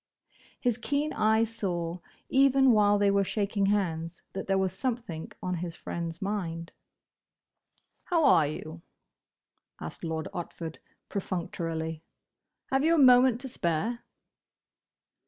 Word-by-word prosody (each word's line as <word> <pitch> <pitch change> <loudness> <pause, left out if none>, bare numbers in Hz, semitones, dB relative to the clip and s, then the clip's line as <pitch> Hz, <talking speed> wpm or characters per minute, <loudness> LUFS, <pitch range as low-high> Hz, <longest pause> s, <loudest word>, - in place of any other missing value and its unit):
His 245 -2 0
keen 290 +4 -1
eye 220 +1 +3
saw, 180 -6 -3 0.3
even 270 -1 +5
while 205 -2 +5
they 200 0 +3
were 200 0 +3
shaking 200 0 0
hands, 170 -5 -1
that 195 - -5
there 195 0 +2
was 190 -1 0
something 225 -8 -3
on 180 - -1
his 170 0 -5
friend's 170 -1 -5
mind. 170 -5 -3 1.3
"How 335 -4 +2
are 160 - +6
you?" 155 +2 -7 1.0
asked - - -7
Lord 160 -1 -3
Otford, 165 -2 -6 0.3
perfunctorily. 165 -4 -3 0.7
"Have 270 +1 +2
you 330 +2 +4
a - - +1
moment 250 -3 +6
to 265 - -5
spare?" 225 +3 -1
200 Hz, 120 wpm, -29 LUFS, 165-240 Hz, 1.3 s, are